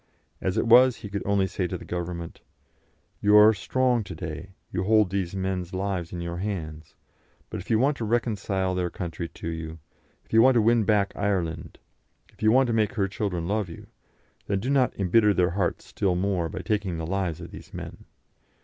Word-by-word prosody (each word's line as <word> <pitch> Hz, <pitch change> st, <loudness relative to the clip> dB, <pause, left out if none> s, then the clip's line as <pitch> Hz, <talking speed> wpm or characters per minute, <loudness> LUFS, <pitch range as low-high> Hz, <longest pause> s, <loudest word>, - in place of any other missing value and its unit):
As 95 Hz, -, -1 dB
it -, -, +2 dB
was, 125 Hz, +2 st, +7 dB
he 100 Hz, -, -9 dB
could 100 Hz, 0 st, -3 dB
only 100 Hz, -1 st, +2 dB
say 95 Hz, -1 st, -2 dB
to -, -, -4 dB
the -, -, -11 dB
Government: 85 Hz, -1 st, -5 dB, 0.8 s
You 105 Hz, 0 st, +4 dB
are 105 Hz, +1 st, +8 dB
strong 125 Hz, +4 st, +1 dB
to 90 Hz, -, -7 dB
day; 85 Hz, +4 st, -7 dB, 0.2 s
you 90 Hz, 0 st, -1 dB
hold 105 Hz, -2 st, +4 dB
these 95 Hz, -2 st, -2 dB
men's 95 Hz, -1 st, -3 dB
lives 95 Hz, -3 st, -2 dB
in 85 Hz, -, -5 dB
your 85 Hz, 0 st, -4 dB
hands; 80 Hz, -6 st, -5 dB, 0.6 s
but -, -, -4 dB
if -, -, -11 dB
you 110 Hz, -, +4 dB
want 135 Hz, +5 st, +2 dB
to 115 Hz, -, -3 dB
reconcile 105 Hz, -5 st, 0 dB
their 90 Hz, -1 st, -1 dB
country 85 Hz, -1 st, -5 dB
to 80 Hz, -, -9 dB
you, 80 Hz, -1 st, -5 dB, 0.5 s
if -, -, -18 dB
you 115 Hz, -, +7 dB
want 130 Hz, +1 st, +6 dB
to 115 Hz, -, +5 dB
win 115 Hz, -1 st, +3 dB
back 100 Hz, -1 st, +2 dB
Ireland, 85 Hz, -5 st, -2 dB, 0.6 s
if -, -, -23 dB
you 110 Hz, 0 st, +4 dB
want 130 Hz, +3 st, +5 dB
to 120 Hz, -, -1 dB
make 110 Hz, -2 st, +1 dB
her 100 Hz, -3 st, 0 dB
children 95 Hz, -4 st, -3 dB
love 105 Hz, -1 st, -1 dB
you 80 Hz, -, -10 dB, 0.6 s
then 100 Hz, -1 st, 0 dB
do 125 Hz, +7 st, -2 dB
not 130 Hz, -6 st, +2 dB
embitter 105 Hz, +2 st, +4 dB
their 90 Hz, -1 st, +2 dB
hearts 90 Hz, -1 st, -1 dB
still 95 Hz, -3 st, -1 dB
more 90 Hz, -2 st, 0 dB
by -, -, -5 dB
taking 100 Hz, -6 st, -1 dB
the 80 Hz, -, -4 dB
lives 90 Hz, -2 st, -2 dB
of 85 Hz, -, -9 dB
these -, -, -11 dB
men. -, -, -8 dB
95 Hz, 205 wpm, -26 LUFS, 85-110 Hz, 0.8 s, are